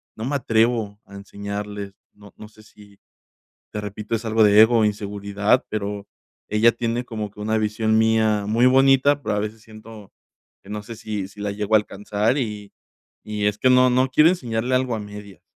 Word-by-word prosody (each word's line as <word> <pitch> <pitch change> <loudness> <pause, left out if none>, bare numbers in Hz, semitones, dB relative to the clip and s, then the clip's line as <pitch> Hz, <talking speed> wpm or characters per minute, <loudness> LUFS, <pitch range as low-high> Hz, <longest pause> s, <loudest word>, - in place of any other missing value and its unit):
no 110 - -7
me 140 +3 -2
atrevo 110 -3 0
a 100 - -14
enseñarles, 100 0 -7 0.2
no 105 -1 -17
no 105 - -11
sé 110 0 -19
si 105 -2 -19 0.7
te 105 - -4
repito, 105 +2 -5
es 115 +1 -3
algo 110 0 +3
de 105 0 +6
ego 115 +2 +6
o 110 - +3
inseguridad, 100 +2 0
pero 100 -1 -4 0.4
ella 110 +3 +4
tiene 120 +1 -2
como 110 -3 -5
que 105 - -15
una 110 +1 -1
visión 110 +1 0
mía 110 -2 +2
muy 115 +4 +3
bonita, 135 +2 +4
pero 105 - -2
a - - 0
veces 110 +1 -5
siento 110 -2 -14 0.5
que 100 - -18
no 105 0 -5
sé 115 +2 -10
si 105 -4 -5
si 100 +1 -15
la 105 0 -2
llego 105 +1 -2
a - - +8
alcanzar 105 +3 -2
y 105 -5 -5 0.5
y 105 -1 -2
es 105 0 0
que 130 - +3
no, 125 0 +5
no 130 +1 +2
quiero 150 +4 +5
enseñarle 125 -7 -2
algo 130 -2 0
a 110 - -4
medias. 105 -1 -11
110 Hz, 195 wpm, -22 LUFS, 105-115 Hz, 0.7 s, a